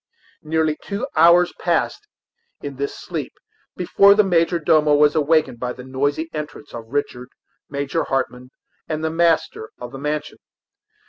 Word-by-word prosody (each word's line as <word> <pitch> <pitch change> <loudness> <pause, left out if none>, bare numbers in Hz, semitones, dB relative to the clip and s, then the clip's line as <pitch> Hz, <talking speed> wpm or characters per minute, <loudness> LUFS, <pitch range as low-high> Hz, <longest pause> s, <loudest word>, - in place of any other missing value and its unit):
Nearly 155 0 0
two 200 0 -4
hours 170 +2 +5
passed 425 - -1 0.5
in 140 -2 -7
this 140 +1 -4
sleep - - -5 0.4
before 200 +3 +5
the 210 - +5
major 175 -2 +2
domo 155 -2 +3
was 150 0 +4
awakened 155 -5 +1
by 125 0 -3
the 125 - -11
noisy 145 +5 -1
entrance 150 -1 -7
of 115 -1 -8
Richard, 125 -1 -3 0.4
Major 140 +3 -2
Hartmann, 125 -1 -3 0.4
and 155 0 -3
the 160 - 0
master 165 -9 +1
of 125 0 -8
the 135 - -8
mansion. 150 +1 -4
150 Hz, 145 wpm, -21 LUFS, 135-165 Hz, 0.5 s, hours